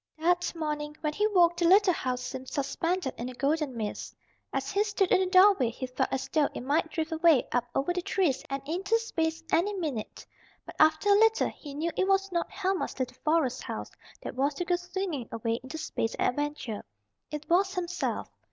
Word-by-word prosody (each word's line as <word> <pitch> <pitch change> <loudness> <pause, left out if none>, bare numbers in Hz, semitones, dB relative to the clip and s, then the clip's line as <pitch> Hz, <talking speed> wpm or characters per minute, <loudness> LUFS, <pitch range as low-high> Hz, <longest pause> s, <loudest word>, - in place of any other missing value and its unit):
That 350 +3 +1
morning 300 -2 -3
when 300 -1 -1
he 420 +6 +2
woke 350 -5 +4
the 345 - +2
little 385 +1 +6
house 255 -4 -2
seemed 260 0 -6
suspended 330 +2 -1
in 240 +2 -3
a 255 - -9
golden 285 -1 0
mist. 215 -2 -4 0.4
As 270 0 -2
he 405 +1 +2
stood 415 -3 0
in - - +6
the 375 - +1
doorway 370 - +6
he 245 +3 -5
felt 255 0 -1
as 270 - -2
though 300 -3 +3
it - - -4
might 295 +5 +1
drift 315 +1 -3
away 320 -4 +4
up 245 -1 +1
over 285 +6 +1
the 360 - -2
trees 350 -7 0
and 275 0 -4
into 390 +8 +1
space 330 -8 -2
any 400 +5 +2
minute. 295 - -4 0.4
But - - -9
after 315 +5 +4
a 405 0 +6
little 445 0 +4
he 285 -2 -10
knew 325 +3 -1
it 380 - +1
was 390 0 +2
not 340 -1 -1
Helma's 385 -1 -2
little 255 -2 -3
forest 305 -5 +1
house - - -6 0.3
that - - -5
was 275 +3 0
to 355 - -3
go 355 - +2
swinging 355 -7 -4
away 230 +1 -2
into 260 +5 -7
space 300 -7 -2
and - - +2
adventure, 290 -5 -3 0.5
it 300 0 -6
was 375 +3 +2
himself. 360 -1 -2
320 Hz, 205 wpm, -29 LUFS, 275-365 Hz, 0.5 s, little